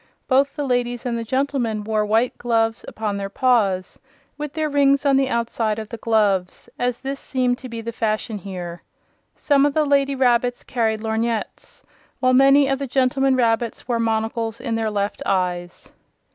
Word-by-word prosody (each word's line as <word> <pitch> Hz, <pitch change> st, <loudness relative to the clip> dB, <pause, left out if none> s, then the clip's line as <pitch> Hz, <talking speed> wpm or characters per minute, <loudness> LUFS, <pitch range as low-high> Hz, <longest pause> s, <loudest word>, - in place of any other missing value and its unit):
Both 275 Hz, +1 st, +2 dB
the 295 Hz, -2 st, -2 dB
ladies 245 Hz, -1 st, -1 dB
and 240 Hz, -2 st, -1 dB
the 230 Hz, -, -3 dB
gentlemen 240 Hz, -3 st, -1 dB
wore 215 Hz, 0 st, 0 dB
white 220 Hz, +4 st, +1 dB
gloves 225 Hz, -1 st, 0 dB
upon 210 Hz, -2 st, -3 dB
their 195 Hz, 0 st, -4 dB
paws, 200 Hz, -6 st, +1 dB, 0.4 s
with 300 Hz, -1 st, -5 dB
their 310 Hz, 0 st, -1 dB
rings 280 Hz, -1 st, +3 dB
on 275 Hz, -1 st, +4 dB
the 270 Hz, -1 st, +2 dB
outside 230 Hz, -2 st, -1 dB
of 220 Hz, -1 st, -6 dB
the 230 Hz, -, -6 dB
gloves, 205 Hz, -5 st, 0 dB
as 245 Hz, -1 st, -1 dB
this 275 Hz, +1 st, -4 dB
seemed 250 Hz, -2 st, -1 dB
to 255 Hz, -, -9 dB
be 230 Hz, -1 st, -6 dB
the 230 Hz, +1 st, -5 dB
fashion 215 Hz, -1 st, -2 dB
here. 175 Hz, -2 st, -7 dB, 0.5 s
Some 280 Hz, -2 st, +2 dB
of 285 Hz, -1 st, +1 dB
the 310 Hz, -1 st, +3 dB
lady 280 Hz, -1 st, +2 dB
rabbits 245 Hz, -1 st, +1 dB
carried 220 Hz, -3 st, -1 dB
lorgnettes, 225 Hz, 0 st, -3 dB, 0.4 s
while 255 Hz, -1 st, +3 dB
many 275 Hz, +2 st, +6 dB
of 270 Hz, 0 st, 0 dB
the 275 Hz, -, -3 dB
gentlemen 265 Hz, +1 st, +2 dB
rabbits 230 Hz, -2 st, 0 dB
wore 240 Hz, -2 st, 0 dB
monocles 225 Hz, 0 st, -1 dB
in 240 Hz, -2 st, -3 dB
their 225 Hz, -1 st, 0 dB
left 205 Hz, -1 st, -2 dB
eyes. 180 Hz, -2 st, -2 dB
235 Hz, 175 wpm, -22 LUFS, 220-270 Hz, 0.5 s, many